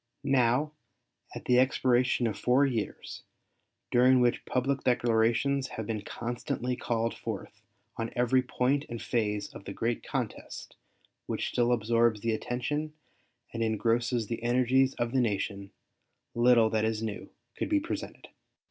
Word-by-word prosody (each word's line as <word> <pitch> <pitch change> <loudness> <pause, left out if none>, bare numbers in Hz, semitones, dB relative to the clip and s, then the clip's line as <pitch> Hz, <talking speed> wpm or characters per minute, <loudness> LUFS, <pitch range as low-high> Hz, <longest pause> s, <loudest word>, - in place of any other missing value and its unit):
Now, 135 +1 +2 0.6
at - - -8
the 125 0 +4
expiration 130 -1 +2
of 110 - -1
four 130 +3 +3
years, 115 -6 -4 0.7
during 125 +1 +5
which 120 -1 +2
public 135 +1 -1
declarations 120 +3 +2
have 110 - -3
been 110 -1 -3
constantly 120 +2 -3
called 115 -1 -1
forth - - -7 0.4
on 115 0 -3
every 125 +1 +3
point 130 +3 0
and 115 -1 -5
phase 105 -4 -2
of 100 - -11
the 100 - -6
great 115 +2 -1
contest - - -5 0.5
which - - -2
still 120 0 +1
absorbs 115 -1 +2
the 115 -1 0
attention 145 +7 -3 0.6
and 115 - -3
engrosses 115 +1 +1
the 115 +1 -4
energies 130 +2 +2
of 120 -1 -2
the 130 0 +2
nation, 100 -3 -2 0.6
little 120 -2 +4
that 110 -1 +1
is 110 0 -1
new 110 -2 -5 0.3
could - - -3
be 305 -1 +3
presented. 325 +3 -6
120 Hz, 140 wpm, -29 LUFS, 115-130 Hz, 0.7 s, during